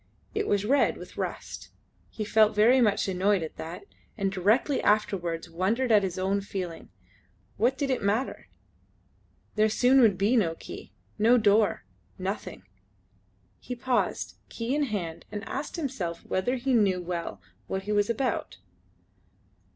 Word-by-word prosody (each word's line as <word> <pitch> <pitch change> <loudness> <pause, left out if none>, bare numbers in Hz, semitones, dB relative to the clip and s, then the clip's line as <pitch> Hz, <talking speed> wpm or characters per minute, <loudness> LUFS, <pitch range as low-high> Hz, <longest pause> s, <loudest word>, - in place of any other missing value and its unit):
It 425 -1 -1
was 205 0 +1
red 275 +5 +3
with - - -11
rust. - - -5 0.4
He 215 - -5
felt 215 0 +4
very 240 +5 +5
much 205 -3 +2
annoyed 190 0 +1
at 160 - -7
that, 175 +5 -7 0.3
and 195 -2 0
directly 210 +9 +2
afterwards 180 -6 0
wondered 220 +9 0
at 210 -2 +6
his 190 -2 -3
own 195 +2 0
feeling. 185 -4 -6 0.7
What 245 +5 +2
did 280 -2 -1
it 260 - 0
matter? 210 +6 -1 1.1
There 215 0 +3
soon 255 +4 +4
would 210 -6 +5
be 205 +6 +2
no 170 -8 +2
key - - -10 0.3
no 230 +4 +5
door 210 -1 +3 0.3
nothing! - - -5 1.0
He 250 - -6
paused, 245 0 -1
key 230 +2 -3
in 295 0 +2
hand, 180 -9 -4
and 210 0 -5
asked 280 +2 -4
himself 245 - -4
whether 245 +8 0
he 260 +1 -1
knew 200 -6 +3
well 170 - -4 0.3
what 190 0 -3
he 210 - -4
was 205 0 +2
about. 250 +3 -1
210 Hz, 150 wpm, -27 LUFS, 190-245 Hz, 1.1 s, at